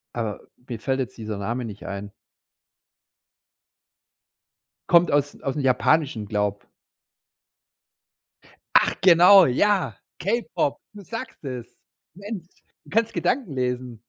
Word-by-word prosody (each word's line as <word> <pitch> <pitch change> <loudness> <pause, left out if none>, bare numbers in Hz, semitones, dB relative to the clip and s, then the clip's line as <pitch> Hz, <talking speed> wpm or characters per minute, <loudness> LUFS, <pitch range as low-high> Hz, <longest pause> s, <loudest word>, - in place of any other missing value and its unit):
Aber 110 -4 -3 0.3
mir 120 -3 -5
fällt 135 0 -1
jetzt 130 -1 -5
dieser 110 -2 -5
Name 120 +5 -3
nicht 105 -2 -9
ein. 100 +1 -6 2.8
Kommt 175 0 +5
aus 145 0 0
aus'm 140 +2 -2
Japanischen, 130 -3 +1
glaube. 105 -1 -2 2.1
Ach - - +4
genau, 180 +1 +8
ja, 195 +9 +1 0.2
K-Pop, 185 - -1
du 205 -1 -11
sagst 225 - -8
es. 125 -3 -5 0.5
Mensch, 200 -1 -7 0.4
du - - -18
kannst 225 +1 +1
Gedanken 240 - -1
lesen. 125 -3 -3
135 Hz, 105 wpm, -24 LUFS, 115-185 Hz, 2.8 s, genau